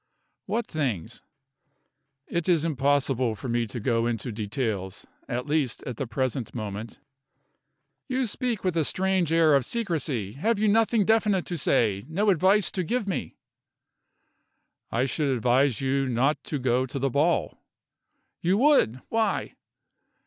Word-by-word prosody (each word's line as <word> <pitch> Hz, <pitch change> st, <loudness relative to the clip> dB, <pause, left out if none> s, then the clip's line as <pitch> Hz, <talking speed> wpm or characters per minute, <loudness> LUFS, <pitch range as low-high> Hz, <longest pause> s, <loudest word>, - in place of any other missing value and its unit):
"What 225 Hz, +4 st, -1 dB
things?" 120 Hz, -, -3 dB, 1.0 s
"It 170 Hz, 0 st, -2 dB
is 165 Hz, -3 st, +3 dB
impossible 135 Hz, -5 st, +1 dB
for 110 Hz, -, -7 dB
me 120 Hz, 0 st, 0 dB
to 115 Hz, +4 st, -6 dB
go 115 Hz, 0 st, +1 dB
into 120 Hz, +1 st, -3 dB
details 105 Hz, -3 st, -3 dB, 0.2 s
at 125 Hz, 0 st, -2 dB
least 145 Hz, -4 st, -1 dB
at 125 Hz, -, -6 dB
the 135 Hz, -, -3 dB
present 130 Hz, -2 st, -2 dB
moment." 110 Hz, 0 st, -5 dB, 1.1 s
"You 260 Hz, -1 st, 0 dB
speak 240 Hz, 0 st, -3 dB
with 185 Hz, -3 st, 0 dB
a 165 Hz, -, +2 dB
strange 185 Hz, 0 st, 0 dB
air 165 Hz, -2 st, +5 dB
of 140 Hz, -2 st, +4 dB
secrecy. 155 Hz, -, -2 dB
Have 215 Hz, -, 0 dB
you 215 Hz, +1 st, +2 dB
nothing 220 Hz, 0 st, +3 dB
definite 215 Hz, -4 st, +2 dB
to 175 Hz, -, -3 dB
say 105 Hz, -, +1 dB
no 200 Hz, +6 st, +2 dB
advice 190 Hz, +3 st, +3 dB
to 185 Hz, -, -2 dB
give 230 Hz, +4 st, -1 dB
me?" 190 Hz, -, -3 dB, 1.5 s
"I 120 Hz, +3 st, +1 dB
should 140 Hz, +3 st, -1 dB
advise 125 Hz, 0 st, +2 dB
you 135 Hz, 0 st, +1 dB
not 130 Hz, +5 st, +1 dB
to 150 Hz, -, -2 dB
go 130 Hz, 0 st, +1 dB
to 135 Hz, -, -6 dB
the 135 Hz, 0 st, 0 dB
ball." 155 Hz, +6 st, +1 dB, 0.8 s
"You 180 Hz, +3 st, +2 dB
would! 240 Hz, -, +3 dB
Why?" 225 Hz, -2 st, 0 dB
140 Hz, 145 wpm, -26 LUFS, 120-190 Hz, 1.5 s, air